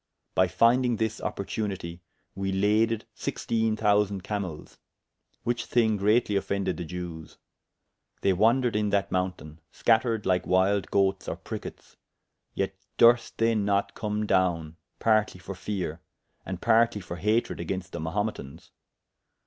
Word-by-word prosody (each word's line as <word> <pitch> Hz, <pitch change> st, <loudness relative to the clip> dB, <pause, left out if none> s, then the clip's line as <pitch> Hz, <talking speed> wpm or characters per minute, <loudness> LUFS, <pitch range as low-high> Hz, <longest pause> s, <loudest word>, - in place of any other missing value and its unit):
By 95 Hz, -, +4 dB
fyndyng 120 Hz, +5 st, +3 dB
this 110 Hz, -1 st, -2 dB
opportunitie, 95 Hz, -4 st, -4 dB, 0.3 s
we 95 Hz, 0 st, -2 dB
laded 105 Hz, +3 st, +2 dB
sixtiene 110 Hz, -1 st, -1 dB
thousand 100 Hz, -2 st, +2 dB
camels; 95 Hz, -7 st, -5 dB, 0.6 s
which 120 Hz, 0 st, -1 dB
thyng 110 Hz, -4 st, +2 dB
greatly 105 Hz, +1 st, +2 dB
offended 100 Hz, 0 st, -1 dB
the 85 Hz, -, -4 dB
Jewes. 85 Hz, -2 st, -7 dB, 0.8 s
They 95 Hz, -, +3 dB
wandred 115 Hz, +5 st, +3 dB
in 105 Hz, -1 st, +1 dB
that 100 Hz, -1 st, 0 dB
mountayne, 90 Hz, -4 st, -3 dB
scattered 115 Hz, -2 st, +2 dB
lyke 90 Hz, -1 st, +1 dB
wylde 95 Hz, +2 st, +2 dB
goates 95 Hz, -1 st, +1 dB
or -, -, -2 dB
prickettes, -, -, -8 dB, 0.6 s
yet 95 Hz, 0 st, -1 dB, 0.2 s
durst 120 Hz, 0 st, +5 dB
they 115 Hz, 0 st, +3 dB
not 100 Hz, -2 st, +1 dB
come 105 Hz, 0 st, -2 dB
downe, 85 Hz, -5 st, +1 dB, 0.2 s
partly 110 Hz, -4 st, +2 dB
for 95 Hz, +2 st, -7 dB
feare, 90 Hz, -4 st, -4 dB, 0.5 s
and 95 Hz, -1 st, -4 dB
partly 115 Hz, 0 st, +3 dB
for 85 Hz, -2 st, -7 dB
hatred 105 Hz, +7 st, 0 dB
agaynst 95 Hz, -1 st, -4 dB
the -, -, -5 dB
Mahumetans. 80 Hz, -3 st, -4 dB
100 Hz, 130 wpm, -27 LUFS, 90-110 Hz, 0.8 s, durst